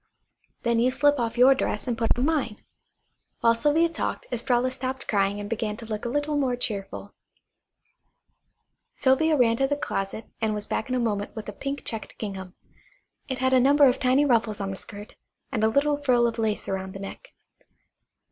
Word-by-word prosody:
Then 235 -1 +2
you 245 +2 +4
slip 290 +2 +3
off 235 0 -2
your 255 +2 +7
dress 265 - -2
and 240 - 0
put 225 +1 +1
on 250 - +1
mine." 285 -9 -1 0.8
While 230 0 +5
Sylvia 295 +7 +3
talked 330 - -3
Estralla 245 +1 +1
stopped 260 +1 -4
crying 200 -1 +1
and 205 - -5
began 215 -1 -2
to 230 - -9
look 215 0 -5
a - - -1
little 290 +3 -1
more 265 -4 +1
cheerful. 205 -3 -5 1.8
Sylvia 300 +4 +3
ran 230 -3 +3
to 270 - +2
the 285 - 0
closet 195 -5 -3 0.2
and 220 -1 +1
was 210 0 -2
back 220 - -3
in 255 - 0
a - - +1
moment 210 -4 -2
with 220 -2 -7
a - - -6
pink 275 +6 -5
checked 225 -1 -5
gingham. 190 -3 -6 0.7
It 260 - -3
had 260 +1 +1
a 260 - +6
number 285 +3 +5
of 255 -1 +3
tiny 260 +2 +3
ruffles 230 -5 +1
on 195 -1 -3
the - - -4
skirt, 205 +2 -8 0.3
and 215 - -1
a - - +5
little 285 +5 +2
frill 250 -4 +3
of 230 0 -1
lace 220 -2 -1
around 190 0 -3
the - - -6
neck. 200 - -9
240 Hz, 195 wpm, -26 LUFS, 215-270 Hz, 1.8 s, your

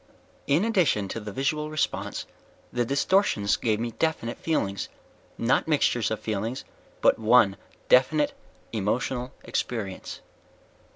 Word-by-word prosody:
"_ - - -32 0.4
"In 155 +9 +3
addition 175 - +2
to 115 - -4
the 105 -1 -7
visual 150 +6 -1
response, 155 -1 -2 0.5
the 120 - +1
distortions 140 - +2
gave 110 -2 0
me 120 +1 -2
definite 135 -4 -2
feelings. 100 -12 -1 0.5
Not 120 +6 +2
mixtures 140 -6 +2
of 110 - -2
feelings, 110 +4 -3 0.4
but - - +4
one - - +5 0.3
definite 300 - +4 0.4
emotional 120 +4 -1
experience." 100 -6 -4
125 Hz, 120 wpm, -26 LUFS, 110-155 Hz, 0.5 s, one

